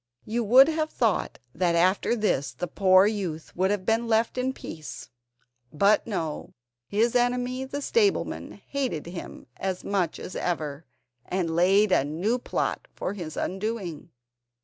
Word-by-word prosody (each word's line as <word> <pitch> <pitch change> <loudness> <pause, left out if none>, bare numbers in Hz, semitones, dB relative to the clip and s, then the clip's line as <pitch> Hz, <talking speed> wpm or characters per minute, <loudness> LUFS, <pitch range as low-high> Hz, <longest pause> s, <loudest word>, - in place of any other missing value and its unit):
You 230 +2 -1
would 255 +6 +8
have 315 -1 0
thought 225 -9 0 0.2
that 170 0 +1
after 185 +7 +3
this 205 - 0
the - - -3
poor 185 +2 +5
youth 190 -7 -3
would 185 +2 +2
have 200 -2 -1
been 225 +2 +1
left 225 0 +2
in 255 +1 0
peace; 155 - -9 0.6
but 200 +8 +3
no, 165 -8 -4 0.3
his 225 +4 +1
enemy 250 +1 +1
the 285 +2 -5
stableman 415 +1 +1
hated 260 - -2
him 170 +1 -8
as 190 -1 -3
much 185 -5 -1
as 180 - -7
ever, 155 -4 -3 0.4
and 175 -3 -1
laid 195 +4 +4
a 135 - +4
new 180 - -1
plot - - -2
for - - -3
his 170 -6 -7
undoing. 190 -5 -3
200 Hz, 150 wpm, -26 LUFS, 170-235 Hz, 0.6 s, would